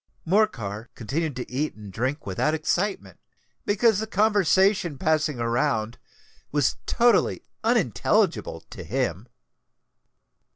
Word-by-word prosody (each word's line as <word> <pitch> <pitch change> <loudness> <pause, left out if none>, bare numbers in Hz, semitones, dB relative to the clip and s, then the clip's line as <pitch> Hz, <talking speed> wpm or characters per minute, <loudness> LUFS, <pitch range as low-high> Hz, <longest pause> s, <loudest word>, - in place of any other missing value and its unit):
Morcar 120 - 0
continued 145 +5 -3
to 125 - -6
eat 145 +5 -2
and 105 -3 -11
drink 130 +8 -2
without 125 +11 0
excitement, 185 +6 -2 0.5
because 210 0 +3
the 220 - -3
conversation 195 -5 +2
passing 155 -2 +1
around 115 -1 0 0.5
was 145 -2 +1
totally 240 -3 +3 0.2
unintelligible 205 - +1
to - - -8
him. 120 -4 -2
150 Hz, 100 wpm, -25 LUFS, -, 0.5 s, because